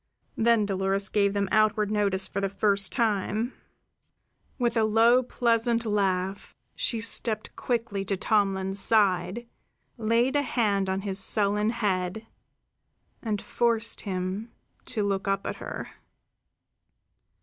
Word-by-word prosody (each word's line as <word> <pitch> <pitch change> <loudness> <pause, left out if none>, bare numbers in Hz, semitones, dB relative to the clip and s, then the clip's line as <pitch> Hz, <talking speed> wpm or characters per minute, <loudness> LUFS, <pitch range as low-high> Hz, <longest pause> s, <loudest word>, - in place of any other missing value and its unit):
Then 230 -2 +3
Dolores 195 0 0
gave 200 -1 +2
them 200 -1 0
outward 215 -1 +2
notice 200 -2 +1
for 200 - -3
the 195 - 0
first 200 0 +1
time. 220 +1 0 1.0
With 240 -2 0
a 225 - +3
low, 225 +3 +4
pleasant 235 -1 +1
laugh, 195 -2 -1 0.2
she 230 - -1
stepped 220 -1 -2
quickly 230 -5 -2
to 195 0 -1
Tomlin's 195 -1 +1
side, 205 +2 +2 0.5
laid 230 +4 +1
a 290 - +3
hand 205 -8 0
on 190 +1 -1
his 195 -1 -2
sullen 210 +1 +2
head, 205 -2 -2 1.0
and 215 -3 -2
forced 230 0 0
him 190 +3 -4 0.3
to 220 -4 -2
look 195 0 -1
up 195 0 0
at - - -4
her. - - -7
210 Hz, 125 wpm, -27 LUFS, 195-230 Hz, 1.0 s, low